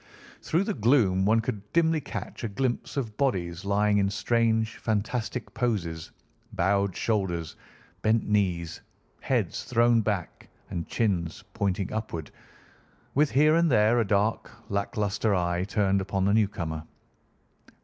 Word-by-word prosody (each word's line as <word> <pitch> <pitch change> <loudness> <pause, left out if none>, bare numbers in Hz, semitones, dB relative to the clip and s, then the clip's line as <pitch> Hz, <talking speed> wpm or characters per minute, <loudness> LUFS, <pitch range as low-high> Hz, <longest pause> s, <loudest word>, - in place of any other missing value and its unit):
Through 170 +4 +1
the 210 - -2
gloom 105 -6 +3
one 110 +2 +4
could 105 -3 -5
dimly 165 -2 +3
catch 135 - -7
a - - 0
glimpse 125 +5 -2
of 110 -6 -3
bodies 90 -10 -1
lying 105 +1 +2
in 100 0 +2
strange 110 +1 +1
fantastic 110 +3 -2
poses, 85 -10 -2 0.4
bowed 100 0 +1
shoulders, 95 -7 -1 0.5
bent 110 +2 +2
knees, 90 -6 0 0.4
heads - - -1
thrown 120 -1 +3
back, 100 -5 -3 0.2
and 85 -2 -3
chins 90 -6 -1
pointing 100 -3 -1
upward, 85 -9 -4 0.8
with 145 +1 +3
here 150 +3 +4
and 170 0 +3
there 110 -1 +4
a - - +3
dark, 105 +2 +1 0.2
lack 100 +3 -2
lustre 105 0 +1
eye 90 0 0
turned 100 -1 +1
upon 95 0 -1
the 100 - +3
newcomer. 85 -7 0
105 Hz, 135 wpm, -27 LUFS, 95-115 Hz, 0.8 s, one